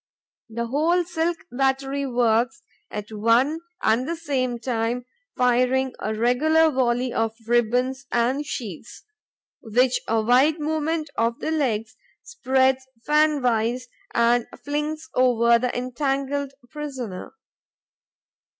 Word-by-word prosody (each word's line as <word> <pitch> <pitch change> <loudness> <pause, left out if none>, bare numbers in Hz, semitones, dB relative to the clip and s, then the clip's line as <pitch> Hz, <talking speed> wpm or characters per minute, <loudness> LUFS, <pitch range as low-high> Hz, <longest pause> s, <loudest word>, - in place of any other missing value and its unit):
The 235 +1 -3
whole 320 +8 +2
silk 335 0 -1
battery 270 +2 0
works 240 +2 +1 0.3
at 210 +1 -6
one 230 +8 +2 0.2
and 230 +4 +2
the 335 - -1
same 265 -7 -1
time, 235 0 -2 0.3
firing 255 +1 +2
a 215 +1 -2
regular 310 +8 +3
volley 250 -1 0
of 225 0 0
ribbons 245 +3 +1
and 245 +5 +1
sheets, 235 - -7 0.6
which 245 +3 +2
a 225 0 +2
wide 265 +7 +4
movement 310 0 -1
of 230 +1 +1
the - - -2
legs 230 -8 -1 0.3
spreads 265 - +1 0.2
fan 300 -2 +3
wise 245 +1 0 0.3
and 235 0 +3 0.2
flings 300 +2 -3
over 235 -2 +4
the 250 0 -2
entangled 275 +2 -2 0.2
prisoner. 265 - -6
255 Hz, 115 wpm, -24 LUFS, 235-290 Hz, 0.6 s, wide